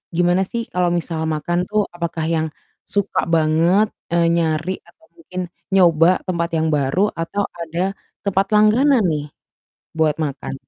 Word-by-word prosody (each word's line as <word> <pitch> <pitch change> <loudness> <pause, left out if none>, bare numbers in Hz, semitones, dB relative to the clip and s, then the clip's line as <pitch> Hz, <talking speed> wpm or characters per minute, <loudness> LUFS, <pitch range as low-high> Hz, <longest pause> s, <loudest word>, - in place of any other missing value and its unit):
gimana 175 +2 +3
sih 235 -1 -3
kalau 180 -1 +2
misal 165 -2 -2
makan 175 +4 -1
tuh? 210 -1 +1
Apakah 170 -2 -3
yang 160 -1 0 0.4
suka 200 -1 0
banget, 165 +5 +3 0.3
eee, 170 -1 +3
nyari 165 +1 0
atau 320 - -23
mungkin 185 - -6 0.3
nyoba 175 -1 +5
tempat 170 -2 -1
yang 160 0 +1
baru 150 +8 +1
atau 185 +5 -2 0.2
ada 175 +4 -2 0.3
tempat 195 0 +2
langganan 235 +5 +4
nih 150 -1 -2 0.7
buat 155 -2 +2
makan? 140 -2 -3
170 Hz, 140 wpm, -20 LUFS, 160-195 Hz, 0.7 s, nyoba